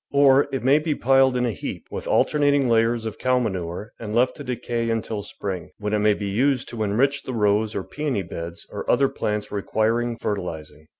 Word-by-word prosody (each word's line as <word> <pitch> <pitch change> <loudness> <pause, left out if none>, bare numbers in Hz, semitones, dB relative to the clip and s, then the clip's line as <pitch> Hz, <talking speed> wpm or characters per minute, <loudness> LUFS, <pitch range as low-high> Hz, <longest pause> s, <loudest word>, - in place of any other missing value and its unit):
Or 140 -1 +5
it 135 -2 -3
may 135 +4 +5
be 155 -1 -1
piled 135 0 +4
in 125 - +1
a 120 - 0
heap, 90 - -6
with - - -5
alter 150 - +2
nating 145 -2 +3
layers 115 0 +2
of 110 - -5
cow 130 0 +2
manure, 95 -3 -3
and 110 -1 -5
left 125 +2 +3
to 145 - -7
decay 120 -2 -2
until 110 -2 -2
spring, 95 -4 -5
when 105 0 -3
it 105 - +2
may 105 0 +3
be 100 - -5
used 130 +6 +1
to 115 -2 -6
enrich 130 +7 +1
the 130 - -6
rose 105 -1 +1
or 100 - -2
peony 145 -7 -2
beds 85 0 -7
or - - -6
other 140 - +4
plants 105 0 -3
requiring 115 +3 0
fer 105 - -1
tilising. 80 -4 -8
115 Hz, 215 wpm, -23 LUFS, 105-130 Hz, -, Or